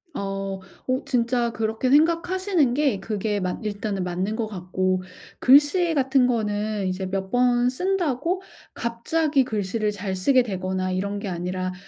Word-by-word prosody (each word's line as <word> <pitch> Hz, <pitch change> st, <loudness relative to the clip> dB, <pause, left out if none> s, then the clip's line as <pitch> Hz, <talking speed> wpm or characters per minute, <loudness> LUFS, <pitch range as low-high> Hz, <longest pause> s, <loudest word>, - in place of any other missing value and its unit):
어. 195 Hz, -1 st, -3 dB, 0.3 s
어 255 Hz, +1 st, 0 dB
진짜 240 Hz, -1 st, +1 dB
그렇게 220 Hz, +3 st, -1 dB
생각하시는 335 Hz, 0 st, +3 dB
게 275 Hz, -8 st, +1 dB
그게 210 Hz, 0 st, -2 dB
맞 180 Hz, -1 st, -2 dB
일단은 205 Hz, -2 st, -3 dB
맞는 185 Hz, +4 st, -2 dB
것 225 Hz, -1 st, -2 dB
같고 185 Hz, -1 st, -1 dB, 0.4 s
글씨 295 Hz, +6 st, +5 dB
같은 265 Hz, -2 st, +3 dB
거는 210 Hz, -3 st, -1 dB
이제 185 Hz, +1 st, -2 dB
몇 190 Hz, 0 st, -3 dB
번 245 Hz, 0 st, +3 dB
쓴다고 355 Hz, +2 st, -1 dB, 0.3 s
갑자기 275 Hz, +5 st, 0 dB
글씨를 210 Hz, -1 st, -1 dB
잘 195 Hz, -2 st, -4 dB
쓰게 255 Hz, +8 st, +4 dB
되거나 185 Hz, -3 st, -2 dB
이런 200 Hz, +2 st, -2 dB
게 200 Hz, -, -5 dB
아니라 185 Hz, +1 st, -3 dB
220 Hz, 280 characters per minute, -24 LUFS, 190-260 Hz, 0.4 s, 글씨